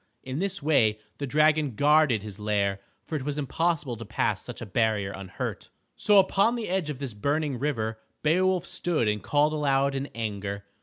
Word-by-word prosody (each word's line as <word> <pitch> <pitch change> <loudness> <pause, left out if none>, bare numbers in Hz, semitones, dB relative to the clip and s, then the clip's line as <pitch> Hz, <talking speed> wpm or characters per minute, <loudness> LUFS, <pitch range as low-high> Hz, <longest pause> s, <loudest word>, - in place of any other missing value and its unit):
In 130 +3 -4
this 190 -3 -2
way 115 -8 +3 0.2
the 140 - -3
dragon 150 -1 +3
guarded 145 -5 +4
his 105 -1 -8
lair, 100 -2 0 0.3
for 160 - -4
it 145 - -2
was 145 +1 -3
impossible 150 -2 -1
to 115 - -7
pass 105 -2 -1
such 125 - -8
a 120 - -5
barrier 105 -1 0
unhurt. 95 -2 -6 0.3
So 210 -1 +4
upon 195 +4 +4
the 230 -5 -4
edge 185 -4 0
of 150 - -4
this 135 -4 -5
burning 140 +4 -1
river 115 -6 -2 0.2
Beowulf 180 +3 +2
stood 160 -10 -1
and 105 -1 0
called 150 +8 +2
aloud 140 -2 +2
in 135 +1 -3
anger. 100 -3 -4
140 Hz, 185 wpm, -27 LUFS, 110-155 Hz, 0.3 s, guarded